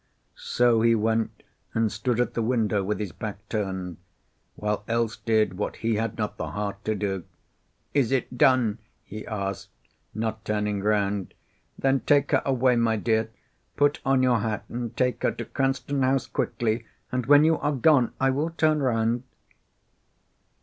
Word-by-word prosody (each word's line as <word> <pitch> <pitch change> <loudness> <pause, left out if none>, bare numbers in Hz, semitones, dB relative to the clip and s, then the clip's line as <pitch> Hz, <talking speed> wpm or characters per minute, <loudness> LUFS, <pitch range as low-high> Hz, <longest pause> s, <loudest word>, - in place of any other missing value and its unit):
So 120 -2 +2
he 115 0 +4
went 110 +1 -1 0.3
and 115 -2 +2
stood 120 +3 -1
at 125 - +1
the 115 - -1
window 110 -4 +1
with 105 +2 -2
his 105 -4 -3
back - - -7
turned, 95 -4 -3 0.6
while 105 0 -2
Else 115 -1 0
did 110 -4 +1
what - - -2
he 115 0 -1
had 110 0 -2
not 105 -1 -3
the - - -3
heart 100 -1 -4
to 110 - 0
do. 95 -3 -2 0.7
"Is 135 -4 +2
it 130 -1 -1
done?" 120 -4 +3 0.2
he 110 +1 -8
asked, 100 -3 -4 0.5
not 110 0 -3
turning 105 -2 -1
round. 100 -2 0 0.4
"Then 135 0 +2
take 145 +1 +2
her - - +4
away, 130 -2 +3
my 115 -1 +2
dear. 110 0 0 0.5
Put 145 0 +3
on 135 -1 +3
your 125 -2 +3
hat, 105 -1 -2
and 120 -1 -5
take 125 -1 +1
her - - +1
to - - -6
Cranston 135 +1 -1
House 130 0 +2
quickly, 115 0 -1 0.3
and 125 -2 -2
when 145 +1 +7
you 160 0 +3
are 145 - 0
gone 135 -2 +4
I 135 0 +3
will 145 +5 0
turn 155 -2 +1
round." 115 -2 +1
115 Hz, 165 wpm, -26 LUFS, 105-130 Hz, 0.7 s, when